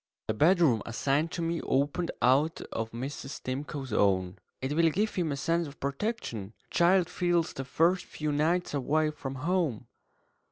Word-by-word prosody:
The - - +2
bedroom 155 - +4
assigned 140 +7 0
to 170 - -2
me 165 0 -1
opened 145 +6 0
out 140 +6 +3
of 115 0 -3
Mrs. 135 +4 -6
Stimcoe's 135 -1 -4
own. 95 -3 +2 0.2
("It 130 +2 -2
will 165 0 +4
give 210 +7 0
him 170 -5 -1
a 140 - -2
sense 165 +3 0
of 145 - -12
protection. 140 - -3 0.2
A - - -14
child 175 0 +4
feels 175 -2 0
the 135 - -5
first 170 +7 +2
few 155 -1 -3
nights 160 +5 +1
away 150 +3 +1
from 135 -3 -6
home.") 150 - 0
150 Hz, 165 wpm, -29 LUFS, 130-170 Hz, 0.2 s, bedroom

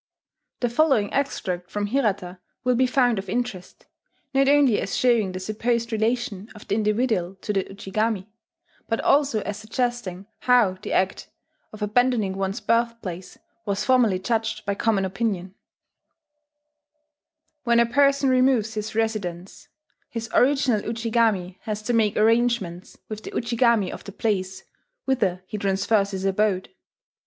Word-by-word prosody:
The 245 - +1
following 240 -5 +2
extract 185 -10 -2
from 205 0 -2
Hirata 205 -6 -1 0.2
will 250 0 +2
be 255 +1 +3
found 245 -4 +2
of 195 -1 -7
interest, 240 -6 -4 0.5
not 270 0 +3
only 280 -5 +4
as - - -3
showing 235 -6 +3
the 185 - -5
supposed 230 +4 -1
relation 220 -2 -1
of 210 - -13
the - - -1
individual 210 -3 0
to 210 - -2
the 195 -2 0
Ujigami, 200 +1 -2 0.6
but 225 - 0
also 275 -6 +3
as 205 0 -4
suggesting 215 -4 -3
how 245 -7 +3
the - - -6
act 190 0 0 0.4
of 215 -1 -7
abandoning 215 -2 +1
one's 195 +1 -2
birthplace 230 -6 -2 0.3
was 200 -1 -2
formerly 245 -7 +4
judged 220 +2 -2
by 200 - 0
common 200 -1 +1
opinion: 190 -2 -2 2.1
"When 235 -2 +3
a 235 - +5
person 275 +3 +3
removes 255 -4 +3
his 215 0 -5
residence, 200 -5 -3 0.4
his 225 -1 -6
original 265 -5 +3
Ujigami 225 -5 0
has 215 -1 -3
to 240 - -1
make 215 -3 +2
arrangements 225 -5 +1
with 215 -1 -6
the - - -6
Ujigami 235 -4 +1
of - - -8
the 200 - -7
place 190 -3 -2 0.4
whither 200 -9 0
he 210 +2 -6
transfers 195 +1 +1
his 190 -1 -4
abode. 195 -1 +1
215 Hz, 140 wpm, -24 LUFS, 195-240 Hz, 2.1 s, a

